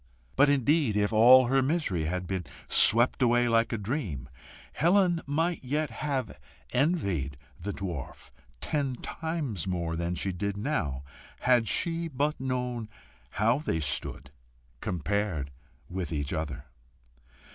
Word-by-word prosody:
But, 145 Hz, +1 st, +5 dB
indeed, 140 Hz, -4 st, +2 dB
if 105 Hz, +1 st, +1 dB
all 125 Hz, +4 st, +8 dB
her 135 Hz, +2 st, +3 dB
misery 130 Hz, -, 0 dB
had 90 Hz, +3 st, -2 dB
been 95 Hz, 0 st, -3 dB, 0.2 s
swept 120 Hz, +4 st, +4 dB
away 120 Hz, 0 st, +4 dB
like 115 Hz, 0 st, +2 dB
a 115 Hz, -, -1 dB
dream, 100 Hz, -, -4 dB, 0.4 s
Helen 175 Hz, +2 st, +3 dB
might 165 Hz, +3 st, 0 dB
yet 145 Hz, +1 st, -1 dB
have 130 Hz, -, -3 dB, 0.3 s
envied 100 Hz, -, 0 dB, 0.2 s
the 100 Hz, +4 st, -4 dB
dwarf 90 Hz, -9 st, -6 dB, 0.3 s
ten 140 Hz, -4 st, -1 dB
times 145 Hz, -, -4 dB
more 85 Hz, -3 st, -2 dB
than 85 Hz, +1 st, -2 dB
she 95 Hz, -, -2 dB
did 100 Hz, +3 st, -3 dB
now, 100 Hz, -, -2 dB, 0.4 s
had 125 Hz, -3 st, +3 dB
she 165 Hz, -, 0 dB
but 150 Hz, +1 st, -1 dB
known 125 Hz, -3 st, -2 dB, 0.5 s
how 115 Hz, +6 st, +3 dB
they 115 Hz, -, -1 dB
stood 70 Hz, -2 st, -2 dB, 0.5 s
compared 90 Hz, -, -2 dB, 0.4 s
with 90 Hz, -2 st, -4 dB
each 70 Hz, -3 st, -2 dB
other. 75 Hz, -3 st, -4 dB
115 Hz, 130 wpm, -28 LUFS, 90-140 Hz, 0.5 s, all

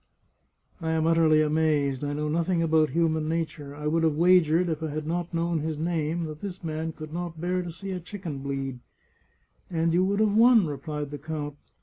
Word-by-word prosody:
" -, -, -48 dB
I 160 Hz, 0 st, -1 dB
am 160 Hz, 0 st, +1 dB
utterly 160 Hz, -2 st, +4 dB
amazed! 150 Hz, -3 st, +1 dB
I 145 Hz, 0 st, -2 dB
know 150 Hz, +1 st, -2 dB
nothing 170 Hz, +2 st, +1 dB
about 160 Hz, -1 st, +3 dB
human 160 Hz, -2 st, +1 dB
nature. 155 Hz, -3 st, -3 dB
I 150 Hz, +1 st, -7 dB
would 165 Hz, +2 st, +2 dB
have 160 Hz, -2 st, +2 dB
wagered, 175 Hz, 0 st, +4 dB
if 160 Hz, -2 st, -2 dB
I 160 Hz, -, -2 dB
had 155 Hz, +1 st, -4 dB
not 170 Hz, +2 st, -2 dB
known 170 Hz, -1 st, 0 dB
his 155 Hz, 0 st, -3 dB
name, 165 Hz, 0 st, -1 dB
that 155 Hz, -1 st, -6 dB
this 190 Hz, -3 st, -6 dB
man 160 Hz, 0 st, -3 dB
could 155 Hz, 0 st, -9 dB
not 170 Hz, -2 st, -4 dB
bear 180 Hz, +2 st, 0 dB
to 175 Hz, -1 st, -6 dB
see 190 Hz, +4 st, -7 dB
a 185 Hz, -, -3 dB
chicken 175 Hz, -5 st, -6 dB
bleed." 135 Hz, -2 st, -4 dB, 0.5 s
" -, -, -41 dB
And 165 Hz, -1 st, +1 dB
you 180 Hz, +2 st, +4 dB
would 200 Hz, +2 st, +1 dB
have 215 Hz, -1 st, +3 dB
won," 230 Hz, -2 st, +6 dB
replied 150 Hz, -1 st, -4 dB
the 145 Hz, -, -6 dB
count. 150 Hz, -1 st, -5 dB
160 Hz, 215 wpm, -27 LUFS, 150-170 Hz, 0.5 s, won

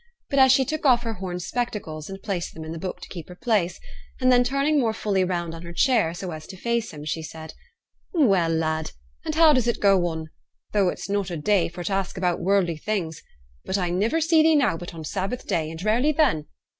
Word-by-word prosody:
But 265 Hz, -2 st, +6 dB
she 265 Hz, 0 st, +4 dB
took 310 Hz, +3 st, -3 dB
off 245 Hz, -4 st, +4 dB
her 230 Hz, -1 st, -2 dB
horn 180 Hz, -3 st, -5 dB
spectacles 180 Hz, -7 st, -4 dB
and 195 Hz, 0 st, -8 dB
placed 190 Hz, -5 st, -3 dB
them 160 Hz, -, -7 dB
in 160 Hz, -, -6 dB
the 165 Hz, -, -5 dB
book 185 Hz, +2 st, -5 dB
to -, -, -8 dB
keep 170 Hz, -3 st, -8 dB
her 180 Hz, -, -9 dB
place; 195 Hz, -5 st, 0 dB, 0.4 s
and 255 Hz, -1 st, +4 dB
then 245 Hz, 0 st, +5 dB
turning 275 Hz, +4 st, +1 dB
more 230 Hz, -4 st, +1 dB
fully 195 Hz, -4 st, 0 dB
round 175 Hz, -2 st, -2 dB
on 165 Hz, -, -8 dB
her 170 Hz, 0 st, -8 dB
chair, 220 Hz, -6 st, +2 dB
so 180 Hz, 0 st, -5 dB
as 155 Hz, -1 st, -8 dB
to 190 Hz, -, -10 dB
face 235 Hz, +2 st, -1 dB
him, 150 Hz, -1 st, -9 dB
she 160 Hz, +1 st, -2 dB
said, 160 Hz, 0 st, -9 dB, 0.6 s
'Well, 195 Hz, -, +3 dB
lad! 160 Hz, -1 st, -1 dB, 0.3 s
and -, -, -3 dB
how 320 Hz, -1 st, +7 dB
does 255 Hz, -4 st, +2 dB
it 235 Hz, -, 0 dB
go 195 Hz, -3 st, +4 dB
on? 160 Hz, -2 st, -5 dB, 0.4 s
Though 200 Hz, -3 st, +3 dB
it's -, -, -5 dB
not 200 Hz, -1 st, -1 dB
a 170 Hz, -, -4 dB
day 185 Hz, +4 st, +2 dB
for 175 Hz, +1 st, -7 dB
t' 195 Hz, -, -2 dB
ask 195 Hz, 0 st, -2 dB
about 180 Hz, -2 st, 0 dB
worldly 180 Hz, -3 st, +1 dB
things. 165 Hz, -3 st, -3 dB, 0.4 s
But 190 Hz, -, -1 dB
I 180 Hz, -2 st, -1 dB
niver 215 Hz, -, +1 dB
see 325 Hz, 0 st, +4 dB
thee 320 Hz, 0 st, +5 dB
now 250 Hz, -, +3 dB
but 175 Hz, +1 st, -8 dB
on 160 Hz, -, -7 dB
Sabbath 195 Hz, +9 st, -3 dB
day, 160 Hz, -2 st, -1 dB
and 165 Hz, +2 st, -7 dB
rarely 240 Hz, +8 st, +2 dB
then. 275 Hz, -, +2 dB
190 Hz, 230 wpm, -24 LUFS, 170-240 Hz, 0.6 s, how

